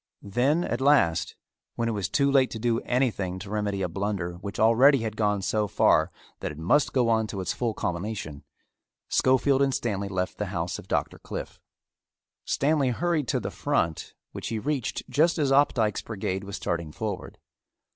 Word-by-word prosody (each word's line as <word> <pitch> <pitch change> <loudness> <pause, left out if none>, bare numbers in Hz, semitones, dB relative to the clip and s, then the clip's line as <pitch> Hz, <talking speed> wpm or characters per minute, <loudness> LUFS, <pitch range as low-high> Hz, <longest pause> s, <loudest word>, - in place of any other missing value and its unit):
Then 130 - +1
at 120 -4 -2
last, 110 - +3 0.4
when 115 - -1
it - - 0
was 100 -4 -2
too 140 0 +2
late 135 -2 +4
to - - -6
do 115 0 +1
anything 110 -8 -1
to 100 +2 -8
remedy 100 -2 -1
a - - +1
blunder 95 -1 -3
which 100 +2 -7
already 115 +4 +5
had 110 -1 -3
gone 105 -3 0
so 105 +2 0
far 80 -3 +3 0.3
that - - -3
it 75 - -10
must 90 - +2
go 125 -3 +2
on 110 -1 +2
to 100 - -5
its 90 -2 -2
full 115 -4 -2
culmination, 85 -5 -4 0.7
Schofield 130 +1 +3
and 135 -1 +2
Stanley 100 -4 -2
left 95 -1 -3
the 105 - -1
house 90 -2 -3
of - - -12
Doctor - - -1
Cliffe. - - -7 0.9
Stanley 140 -2 +2
hurried 155 +2 0
to - - +1
the - - -4
front 80 -2 -1 0.2
which - - -6
he 115 - -2
reached 135 +2 -2
just 165 +3 +2
as 145 -3 +1
Opdycke's 130 -6 +3
brigade 95 -2 -4
was 100 0 -6
starting 85 -5 -3
forward. - - -5
110 Hz, 180 wpm, -26 LUFS, 95-130 Hz, 0.9 s, already